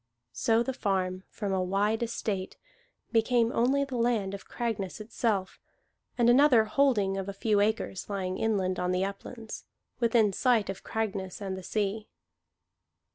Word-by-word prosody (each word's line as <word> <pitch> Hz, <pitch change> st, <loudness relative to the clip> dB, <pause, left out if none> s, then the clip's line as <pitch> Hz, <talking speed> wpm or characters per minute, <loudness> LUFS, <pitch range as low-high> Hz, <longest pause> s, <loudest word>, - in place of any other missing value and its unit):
So 225 Hz, 0 st, +2 dB
the 265 Hz, -, -3 dB
farm, 190 Hz, -4 st, -1 dB
from 200 Hz, -3 st, -3 dB
a 190 Hz, -, +1 dB
wide 200 Hz, +4 st, +1 dB
estate, 210 Hz, -5 st, -3 dB, 0.5 s
became 230 Hz, 0 st, +3 dB
only 265 Hz, +4 st, +2 dB
the 270 Hz, -3 st, -4 dB
land 230 Hz, -5 st, +1 dB
of 200 Hz, -, -8 dB
Cragness 220 Hz, -6 st, -3 dB
itself, 215 Hz, -3 st, -2 dB, 0.6 s
and 240 Hz, -1 st, +3 dB
another 250 Hz, -2 st, +6 dB
holding 215 Hz, -5 st, +2 dB
of 195 Hz, 0 st, -3 dB
a -, -, -4 dB
few 210 Hz, +1 st, +1 dB
acres, 210 Hz, -2 st, -1 dB
lying 185 Hz, -2 st, -2 dB
inland 190 Hz, -5 st, 0 dB
on 180 Hz, 0 st, 0 dB
the 185 Hz, +1 st, +1 dB
uplands, 220 Hz, +3 st, -7 dB, 0.3 s
within 225 Hz, -4 st, +3 dB
sight 230 Hz, -3 st, +2 dB
of 195 Hz, -, -10 dB
Cragness 195 Hz, -4 st, -3 dB
and 195 Hz, -2 st, -4 dB
the 190 Hz, -, -7 dB
sea. 210 Hz, +2 st, -2 dB
210 Hz, 150 wpm, -29 LUFS, 195-230 Hz, 0.6 s, another